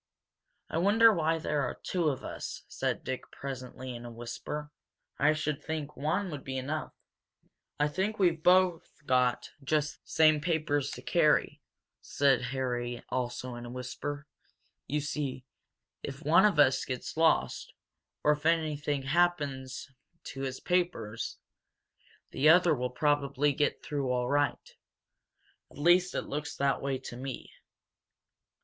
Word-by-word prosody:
"I 160 - -2
wonder 220 +5 +6
why 165 -2 +1
there 150 -2 -1
are 125 - -2
two 175 -4 +1
of 135 - -4
us," - - -6
said - - -2
Dick 130 -1 -5
presently, 130 -1 -7
in 120 - -8
a 120 - -7
whisper. 120 +6 -6 0.5
"I 150 +2 +5
should 155 -1 -2
think 155 -2 -4
one 180 +6 -1
would 145 -3 -6
be 130 0 -4
enough." 145 +4 -4 0.8
"I 150 - +3
think 190 +8 -1
we've 175 -5 +2
both 180 -1 +4 0.2
got 125 -2 +1
just 150 +1 -1
the - - -24
same 155 -2 +5
papers 155 -4 0
to - - -9
carry," - - +2 0.4
said 140 -2 +2
Harry, 120 -3 -3
also 125 0 -3
in 120 0 -7
a 120 - -7
whisper. 130 +4 -5 0.6
"You 150 +2 0
see, 140 -3 -3 0.6
if 140 +2 -7
one 170 +6 +6
of 205 -6 +3
us 135 -2 +5
gets 130 -1 -5
lost, 160 0 +2 0.5
or 150 0 +5
anything 150 -4 0
happens 145 -5 0 0.4
to 135 - -7
his 130 -1 -3
papers, 175 -12 -1 0.9
the 150 +3 +4
other 175 0 +6
will 125 -3 -1
probably 145 +1 +1
get 145 +2 0
through 140 -3 -2
all 125 -1 0
right. 145 0 0 1.0
At - - -17
least 175 +4 +4
it - - -1
looks 150 +1 -4
that 140 -1 +1
way 135 -1 -1
to 130 -2 -9
me." 130 0 -6
145 Hz, 140 wpm, -30 LUFS, 130-160 Hz, 1.0 s, wonder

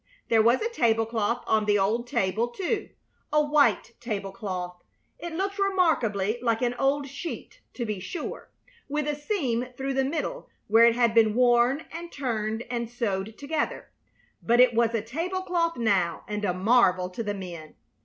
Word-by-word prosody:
There 225 -1 +5
was 235 - +3
a 460 - 0
tablecloth 225 - +1
on 215 -1 +2
the 205 0 +3
old 220 +5 0
table, 205 +2 0
too 385 - -3 0.4
a 300 - +4
white 290 -5 +2
tablecloth. 195 -4 -5 0.4
It 345 - -6
looked 395 +3 -2
remarkably 245 - +1
like 230 -1 0
an 240 0 +1
old 280 +1 +1
sheet, 285 +5 -7
to 240 - -3
be 210 -3 -3
sure, 310 - -6 0.4
with 300 +1 -1
a 295 - +1
seam 285 - -1
through 270 0 -2
the 270 0 +1
middle 320 - -3 0.2
where 225 +2 +6
it 235 -1 +4
had 235 -2 +3
been 220 -2 +4
worn 245 +4 +3
and 340 +1 -7
turned 225 -4 -2
and 235 -2 -3
sewed 220 -3 -3
together; 300 +2 -3 0.5
but 235 +1 +2
it 250 -1 +6
was 230 0 +2
a 215 - -1
tablecloth 340 +5 -2
now, 195 -8 +1
and 210 0 -3
a 180 - +1
marvel 185 -3 +3
to 205 - -5
the 205 -2 -2
men. 170 -5 -8
235 Hz, 165 wpm, -26 LUFS, 215-290 Hz, 0.5 s, where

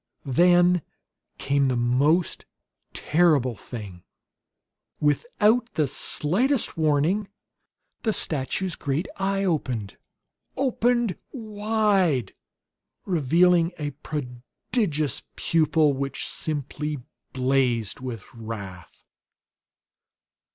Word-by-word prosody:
Then 175 +5 +4 0.6
came 140 0 +1
the 130 -1 +1
most 140 +8 +1 0.4
terrible 150 -7 +2
thing. 100 -6 -9 1.0
Without 220 - +2
the 155 - +2
slightest 225 - 0
warning 160 +6 +1 0.7
the 220 - +1
statue's 165 +2 +1
great 145 +6 -2
eye 195 0 0
opened! 130 - -2 0.6
Opened 240 -5 +1
wide, 210 - 0 0.7
revealing 170 +1 +3
a 145 -1 -3
prodigious 150 - -3
pupil 155 -2 +2
which 135 0 -4
simply 150 0 -3 0.3
blazed 130 -4 +1
with 125 -5 -6
wrath! 105 -6 -8
155 Hz, 75 wpm, -25 LUFS, 130-190 Hz, 1.0 s, Then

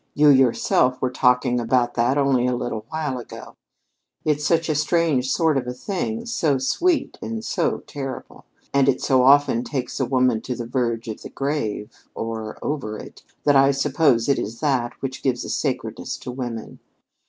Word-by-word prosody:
You 150 0 +6
yourself 130 -1 +3
were 130 - -1
talking 125 -1 +2
about 120 +1 +1
that 120 +4 +1
only 135 -3 +2
a 125 - +1
little 115 -3 -4
while 150 -5 -3
ago. 120 - -10 0.7
It's 150 -1 +1
such 165 +2 +2
a 155 - +1
strange 150 -3 +1
sort 160 -3 +2
of 125 - -7
a 125 - -4
thing, 215 - -3
so 160 - +1
sweet 330 - 0
and 225 -1 -5
so 175 -5 -1
terrible, 135 -2 -7 0.3
and 140 -1 +4
it 130 - +1
so 130 -2 +3
often 135 -2 +5
takes 130 -2 -4
a 130 - +1
woman 125 -3 +2
to 125 - -4
the 120 -1 -5
verge 115 -2 -1
of 110 - -6
the - - -8
grave, 130 -6 -3 0.2
or 110 -1 -5
over 130 -8 -3
it, - - -11 0.2
that 145 -1 +4
I 135 0 +6
suppose 140 -3 +2
it 140 - +2
is 115 +3 -5
that 130 -5 0
which 130 -1 -4
gives 125 -3 -1
a - - -6
sacredness - - -3
to 125 - -6
women. 120 -3 -6
130 Hz, 180 wpm, -23 LUFS, 120-145 Hz, 0.7 s, You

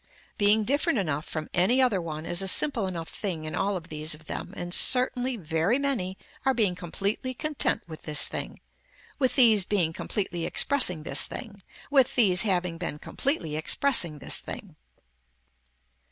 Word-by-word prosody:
Being 210 +1 +4
different 285 +4 +1
enough 155 -6 -2
from 155 -1 -4
any 190 +9 +3
other 240 -8 +2
one 155 -1 -6
is 175 +2 0
a 195 - -2
simple 230 0 +2
enough 170 -3 -5
thing 170 -6 -5
in 155 - -5
all 200 0 -1
of 175 0 -11
these 155 0 -1
of 155 +1 -18
them - - -6
and 175 0 -3
certainly 250 +1 +3
very 165 - 0
many 235 -10 -2 0.3
are 265 -1 +1
being 210 -6 +1
completely 195 +8 -3
content 305 +3 0
with 160 -2 -10
this 150 -2 +3
thing, - - -6 0.6
with 260 -3 +1
these 225 -6 +6
being 180 -5 -1
completely 185 -2 -4
expressing 185 - +3
this - - +3
thing, 210 -4 -9 0.3
with 270 -2 +3
these 195 -7 +4
having 180 -5 -1
been 165 -4 -4
completely 165 - -2
expressing 170 - +2
this 140 - +1
thing. - - -9
190 Hz, 165 wpm, -26 LUFS, 165-245 Hz, 0.6 s, these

